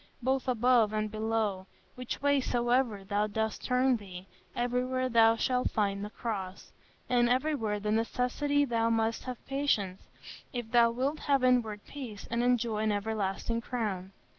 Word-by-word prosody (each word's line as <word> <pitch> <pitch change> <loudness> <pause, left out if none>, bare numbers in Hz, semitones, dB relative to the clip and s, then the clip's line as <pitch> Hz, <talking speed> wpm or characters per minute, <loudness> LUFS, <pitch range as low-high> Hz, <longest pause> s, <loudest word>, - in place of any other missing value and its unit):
Both 265 +1 0
above 240 -3 +3
and 215 0 -1
below, 215 -3 -1 0.3
which 250 +2 -6
way 285 -1 +3
soever 240 -4 +1
thou 205 +2 0
dost 220 +1 -2
turn 250 0 +2
thee, 185 -3 -10 0.3
everywhere 250 +1 0
thou 225 -1 +5
shalt 250 +2 0
find 200 -2 -1
the 210 - -5
Cross; 200 -5 -5 0.4
and 240 -1 +3
everywhere 250 -4 0
of 205 - -6
necessity 250 +6 +1
thou 230 -3 +1
must 225 0 0
have 255 -2 -7
patience, 220 -9 0 0.5
if 240 -3 -5
thou 235 -1 +5
wilt 265 +6 -1
have 275 -3 +1
inward 235 -5 +2
peace, 245 -8 -8
and 235 0 +1
enjoy 240 -3 +1
an 215 0 +1
everlasting 210 +2 -2
crown.... 205 -6 -3
230 Hz, 150 wpm, -30 LUFS, 210-250 Hz, 0.5 s, thou